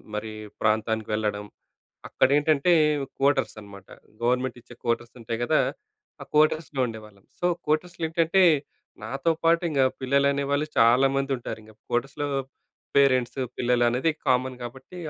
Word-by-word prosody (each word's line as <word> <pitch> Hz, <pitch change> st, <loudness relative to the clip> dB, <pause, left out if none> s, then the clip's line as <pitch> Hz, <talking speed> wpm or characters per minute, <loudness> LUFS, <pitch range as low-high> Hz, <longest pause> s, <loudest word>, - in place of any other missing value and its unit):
మరి 110 Hz, +1 st, -4 dB, 0.3 s
ప్రాంతానికి 110 Hz, 0 st, 0 dB
వెళ్లడం, 105 Hz, -1 st, -1 dB, 0.7 s
అక్కడ -, -, +2 dB
ఏంటంటే 150 Hz, +3 st, +3 dB, 0.5 s
కోటర్స్ 135 Hz, -2 st, +2 dB
అనమాట. 100 Hz, -2 st, -13 dB, 0.4 s
గవర్నమెంట్ 125 Hz, +1 st, 0 dB
ఇచ్చే 120 Hz, +1 st, -15 dB
కోటర్స్ 115 Hz, 0 st, -2 dB
ఉంటాయి 115 Hz, 0 st, -4 dB
కదా! -, -, +3 dB, 0.6 s
ఆ -, -, -7 dB
కోటర్స్‌లో 155 Hz, -2 st, +2 dB
ఉండేవాళ్ళం. 105 Hz, -4 st, -10 dB
సో, 175 Hz, -, 0 dB, 0.2 s
కోటర్స్‌లో 165 Hz, +3 st, -1 dB
ఏంటంటే, 165 Hz, +3 st, +2 dB, 0.6 s
నాతో 135 Hz, +8 st, 0 dB
పాటు 165 Hz, +1 st, +4 dB
ఇంగ 140 Hz, -3 st, 0 dB, 0.2 s
పిల్లలు 140 Hz, +2 st, +2 dB
అనేవాళ్ళు 140 Hz, +1 st, -1 dB
చాలామంది 135 Hz, +4 st, +4 dB
ఉంటారు. 120 Hz, -, -6 dB
ఇంగ 110 Hz, 0 st, -16 dB, 0.2 s
కోటర్స్‌లో 135 Hz, +4 st, -1 dB, 0.7 s
పేరెంట్స్, 130 Hz, -2 st, +3 dB, 0.2 s
పిల్లలు 120 Hz, 0 st, +2 dB
అనేది 125 Hz, +7 st, +1 dB, 0.2 s
కామన్ 130 Hz, 0 st, +1 dB
కాబట్టి, 130 Hz, +8 st, -9 dB
130 Hz, 125 wpm, -25 LUFS, 115-145 Hz, 0.7 s, పాటు